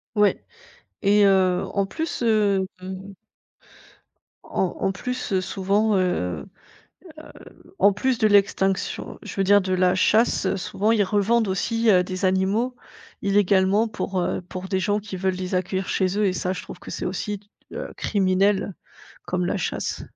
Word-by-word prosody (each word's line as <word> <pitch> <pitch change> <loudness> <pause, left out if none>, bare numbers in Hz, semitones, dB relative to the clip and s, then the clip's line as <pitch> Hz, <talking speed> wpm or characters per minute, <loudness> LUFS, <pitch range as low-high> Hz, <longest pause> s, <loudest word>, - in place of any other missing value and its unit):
Ouais. 210 -1 +3 0.6
Et 205 +1 +4
heu, 185 -2 +3
en 200 -1 +1
plus, 320 +5 -4
heu 205 -4 +2 1.8
en 185 -2 -1
en 195 - +1
plus, 250 +5 -4
heu, 190 - +2
souvent, 200 +3 +1
heu - - +3 0.4
heu, - - -14 1.3
en 200 +2 +6
plus 250 +4 0
de 215 -3 +3
l'extinction, 195 -1 +1
je - - -8
veux 195 - +1
dire, 205 +1 +5
de 185 0 -2
la 185 0 +3
chasse, 220 +5 +2
souvent 205 +3 -1
ils 215 -3 +3
revendent 210 +3 +2
aussi, 225 +4 0
heu, 180 -2 +5
des 185 +1 -3
animaux 195 +7 +1 0.5
illégalement 200 +2 +3
pour, 195 -3 -3
heu, - - -1
pour 185 +1 -8
des 190 -1 0
gens 205 +2 0
qui 200 -2 -7
veulent 190 0 0
les 185 0 -3
accueillir 185 +1 -2
chez 190 +1 0
eux 210 - +2
et 185 - +1
ça 185 0 -2
je - - -7
trouve - - -10
que - - -10
c'est - - -4
aussi, 205 -2 -3 0.3
heu, - - -5
criminel 195 0 +1 0.5
comme 180 -1 -1
la 205 - -1
chasse. 180 - -3
195 Hz, 160 wpm, -23 LUFS, 185-210 Hz, 1.8 s, en